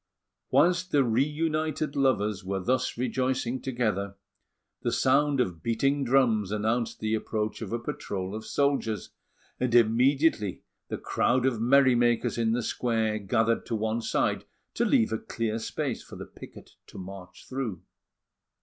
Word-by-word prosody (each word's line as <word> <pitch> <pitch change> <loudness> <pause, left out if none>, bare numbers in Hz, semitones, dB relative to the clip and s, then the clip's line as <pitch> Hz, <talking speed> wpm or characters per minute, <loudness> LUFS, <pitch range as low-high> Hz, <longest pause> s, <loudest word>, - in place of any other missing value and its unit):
Whilst 180 +1 +3
the 145 -4 +3
reunited 150 +4 0
lovers 105 -7 +1
were 95 +1 -2
thus 125 +7 0
rejoicing 125 0 -1
together, 105 -6 -2 0.7
the - - -1
sound 140 +1 +2
of 90 -10 -1
beating 135 - +1
drums 120 -6 +2
announced 110 +3 -1
the 110 0 -1
approach 110 0 -2
of 110 - -5
a 115 - 0
patrol 95 -5 -5
of 110 +1 -5
soldiers; 135 -7 -1 0.5
and 125 -2 0
immediately 120 - +3 0.2
the - - -4
crowd 125 +1 +1
of 120 -4 0
merry 130 +2 +5
makers 120 0 +1
in 115 -1 +2
the 120 0 -1
square 110 -3 0
gathered 110 +3 +1
to 115 - -1
one 110 +1 -1
side - - 0 0.3
to - - +1
leave 110 0 +3
a 110 - -1
clear 115 -1 -3
space - - -3
for - - -12
the - - -7
picket - - -13 0.2
to - - -12
march 95 -1 -10
through. 130 -9 -4
115 Hz, 150 wpm, -27 LUFS, 110-130 Hz, 0.7 s, merry